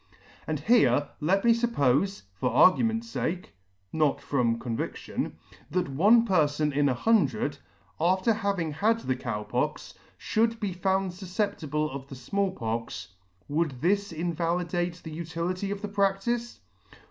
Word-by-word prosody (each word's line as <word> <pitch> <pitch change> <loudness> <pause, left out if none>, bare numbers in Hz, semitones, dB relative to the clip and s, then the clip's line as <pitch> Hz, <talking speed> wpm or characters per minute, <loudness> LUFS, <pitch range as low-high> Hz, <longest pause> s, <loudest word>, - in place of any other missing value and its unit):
And 155 -2 -2
here 155 - +4
let 195 +8 +1
me 235 - +7
fuppofe, 195 - +1
for 95 +7 -1
argument's 225 - +3
fake, 180 +2 -3 0.4
(not 155 -3 +2
from 120 -5 0
con 115 -1 -4
vidion,) - - -4 0.4
that 180 -2 -1
one 210 - +5
perfon 150 -4 +2
in 145 0 +3
an 125 - +1
hundred, 145 - +1 0.4
after 185 +7 +3
having 200 -7 -1
had 220 +9 +1
the 130 - -1
Cow 115 -4 -4
Pox, 105 - -2 0.3
fhould 225 +1 +1
be 200 -3 -2
found 190 +1 0
fufceptible 180 -5 -2
of 135 0 -7
the' 135 - -9
Small 195 +10 -1
Pox, 115 - -4 0.4
would 145 -3 -1
this 200 +4 +1
invalidate 170 +1 -2
the 160 - -7
utility 170 +4 -3
of 200 +1 -4
the - - -1
pradice 200 +4 0
175 Hz, 140 wpm, -27 LUFS, 145-200 Hz, 0.4 s, me